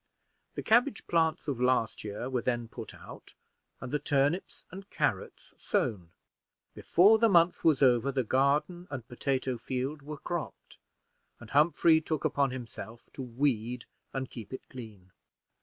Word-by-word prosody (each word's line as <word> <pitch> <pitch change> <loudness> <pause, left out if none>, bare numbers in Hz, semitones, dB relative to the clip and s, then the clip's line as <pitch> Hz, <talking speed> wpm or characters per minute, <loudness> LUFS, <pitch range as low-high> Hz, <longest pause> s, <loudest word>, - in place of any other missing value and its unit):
The - - -4
cabbage 240 +1 +3
plants 160 -2 +1
of 130 -4 -2
last 125 -3 +1
year 105 +3 -5
were 130 -2 -1
then 120 -2 -1
put - - -9
out, - - -13 0.4
and 125 - -7
the 150 - 0
turnips 145 +4 0
and 195 +1 -10
carrots - - -2
sown. 90 -6 -1 0.6
Before 205 +6 +5
the 230 0 +5
month 175 -2 +4
was 150 -4 +4
over, 125 +1 +4
the 130 -1 0
garden 145 - +1
and 130 -5 -6
potato 130 0 -2
field 130 +5 -3
were 150 +2 -7
cropped, 175 +2 -6 0.6
and 120 - -12
Humphrey 160 +2 +4
took 155 -2 -3
upon 140 -1 +2
himself 120 -2 -9
to - - -7
weed 125 -2 -1 0.3
and 130 -1 -3
keep 115 -5 -10
it 130 - -8
clean. 105 -7 -11
135 Hz, 150 wpm, -30 LUFS, 120-160 Hz, 0.6 s, Before